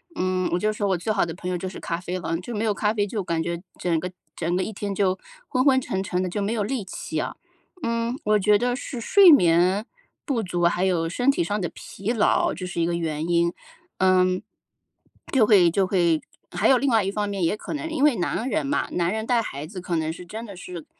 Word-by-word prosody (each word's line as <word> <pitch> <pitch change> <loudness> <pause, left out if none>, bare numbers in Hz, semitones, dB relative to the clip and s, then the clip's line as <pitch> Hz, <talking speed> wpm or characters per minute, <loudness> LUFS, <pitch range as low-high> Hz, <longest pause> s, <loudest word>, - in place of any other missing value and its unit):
嗯， 185 0 0
我 - - +3
就 215 +4 +1
说 205 -1 -2
我 190 - +1
最 180 +6 -2
好 205 -4 +2
的 165 - -5
朋 180 +1 -5
友 180 - -1
就 185 - -4
是 185 - -7
咖 170 - -2
啡 180 0 -4
了， 165 -2 -2
就 225 +6 -6
没 210 - -1
有 215 -2 +2
咖 210 +2 0
啡 205 -2 +1
就 205 0 -3
感 165 -2 -1
觉 170 0 -3 0.2
整 170 -3 0
个 180 - -4 0.3
整 170 +1 -1
个 185 - +1
一 220 - -4
天 200 -1 -4
就 190 -1 +1 0.3
昏 255 - +2
昏 265 -2 +5
沉 190 -5 -2
沉 185 -1 -1
的， 185 - -2
就 205 +4 -3
没 205 +3 -1
有 215 - 0
力 225 0 -3
气 - - -4
啊。 - - -3 0.5
嗯， 230 +2 -1
我 210 0 +4
觉 210 +1 +4
得 245 +2 0
是 250 -1 -6
睡 375 - +7
眠 180 - +4 0.4
不 250 -8 0
足， 175 -1 -1
还 175 +1 +2
有 175 -3 +1
身 245 +10 +2
体 175 - -1
上 205 +3 -1
的 175 - -1
疲 200 +4 -5
劳， 225 -3 +2
这 185 - -6
是 175 -1 -3
一 - - +2
个 170 - -1
原 160 -1 -2
因。 170 0 +2 0.5
嗯。 185 -1 +3 0.9
就 255 -5 +5
会 185 -6 +6
就 190 +1 +1
会 170 -5 +2 0.3
还 - - +1
有 265 - +6
另 275 +3 +1
外 225 -4 +3
一 - - 0
方 205 0 -2
面 200 -1 -3
也 165 - +2
可 - - -6
能 320 +2 -4
因 315 -3 -1
为 295 -4 +5
男 220 +8 -1
人 - - 0
嘛， 290 - 0
男 175 +1 0
人 220 0 -2
带 240 -1 +2
孩 145 -9 -6
子 185 0 -8
可 175 -1 -2
能 160 -1 0
是 175 +2 -9
真 220 +6 -7
的 200 -4 -10
是 175 -3 -8
190 Hz, 270 characters per minute, -24 LUFS, 175-220 Hz, 0.9 s, 睡